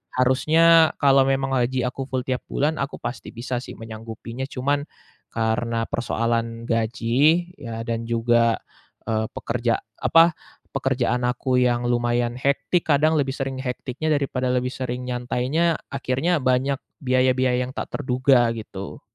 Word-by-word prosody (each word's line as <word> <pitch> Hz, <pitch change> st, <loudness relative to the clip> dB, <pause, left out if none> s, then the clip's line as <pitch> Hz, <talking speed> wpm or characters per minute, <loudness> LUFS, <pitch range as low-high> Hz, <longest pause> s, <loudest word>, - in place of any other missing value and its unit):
harusnya 160 Hz, +6 st, +5 dB
kalau 135 Hz, -2 st, +5 dB
memang 135 Hz, 0 st, 0 dB
aji 125 Hz, +1 st, 0 dB
aku 135 Hz, +2 st, -6 dB
full 130 Hz, -1 st, -1 dB
tiap 130 Hz, -1 st, -1 dB
bulan 155 Hz, +3 st, 0 dB
aku 140 Hz, +1 st, -3 dB
pasti 120 Hz, -, -5 dB
bisa 120 Hz, +2 st, -4 dB
sih -, -, -9 dB
menyanggupinya. 115 Hz, +2 st, -7 dB
Cuman 140 Hz, +2 st, -1 dB, 0.4 s
karena 115 Hz, 0 st, -1 dB
persoalan 115 Hz, 0 st, -1 dB
gaji 120 Hz, +9 st, +2 dB
ya 115 Hz, -3 st, -6 dB
dan 115 Hz, 0 st, -3 dB
juga, 115 Hz, 0 st, +3 dB, 0.5 s
eee, 110 Hz, 0 st, +1 dB
pekerja 115 Hz, 0 st, -1 dB, 0.2 s
apa, 165 Hz, +1 st, +5 dB, 0.4 s
pekerjaan 130 Hz, -3 st, 0 dB
aku 125 Hz, +1 st, 0 dB
yang 120 Hz, -1 st, +1 dB
lumayan 120 Hz, 0 st, 0 dB
hektik, 140 Hz, +6 st, +1 dB
kadang 155 Hz, +3 st, +3 dB
lebih 135 Hz, -2 st, 0 dB
sering 135 Hz, -1 st, -3 dB
hektiknya 130 Hz, +3 st, -3 dB
daripada 135 Hz, -3 st, -1 dB
lebih 125 Hz, 0 st, 0 dB
sering 125 Hz, -1 st, -4 dB
nyantainya, 125 Hz, +7 st, 0 dB
akhirnya 140 Hz, +5 st, 0 dB
banyak 130 Hz, +2 st, +1 dB, 0.2 s
biaya-biaya 130 Hz, -1 st, +2 dB
yang 125 Hz, -, -8 dB
tak -, -, -4 dB
terduga, 125 Hz, -1 st, +3 dB
gitu. 100 Hz, -3 st, -8 dB
125 Hz, 135 wpm, -23 LUFS, 120-135 Hz, 0.5 s, harusnya